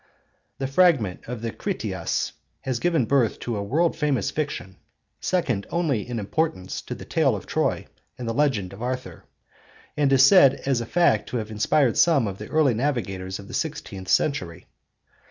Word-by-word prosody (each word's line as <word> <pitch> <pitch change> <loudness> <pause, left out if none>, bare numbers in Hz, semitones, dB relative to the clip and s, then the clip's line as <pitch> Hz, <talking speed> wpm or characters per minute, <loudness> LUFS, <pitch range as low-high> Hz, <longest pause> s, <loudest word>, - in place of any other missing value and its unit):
The 135 - -3
fragment 135 - +2
of 120 -1 -6
the 115 - -2
Critias - - -3 0.3
has 130 -3 -2
given 165 -6 +1
birth 125 -3 +2
to 120 - -3
a 100 - -2
world 160 +13 +1
famous 145 -8 0
fiction, 120 -11 -4 0.4
second 125 - -1
only 145 -10 -1
in 120 - -3
importance 100 - -2
to - - -4
the - - -10
tale - - +2
of - - -7
Troy - - -1 0.3
and 125 - -6
the 115 - -1
legend 115 -10 0
of 100 - -11
Arthur; 125 +1 -5 0.7
and 145 -2 +2
is 135 0 +7
said 140 -5 +7
as 135 -3 +1
a 115 - -6
fact 170 -11 +2
to 125 - -2
have 110 -1 -5
inspired 115 +4 +2
some 155 -8 +4
of 100 -1 -6
the - - -7
early 155 -5 +3
navigators 105 -8 -2
of 100 - -11
the - - -10
sixteenth 95 -1 -4
century. 90 - 0
125 Hz, 175 wpm, -24 LUFS, 105-150 Hz, 0.7 s, is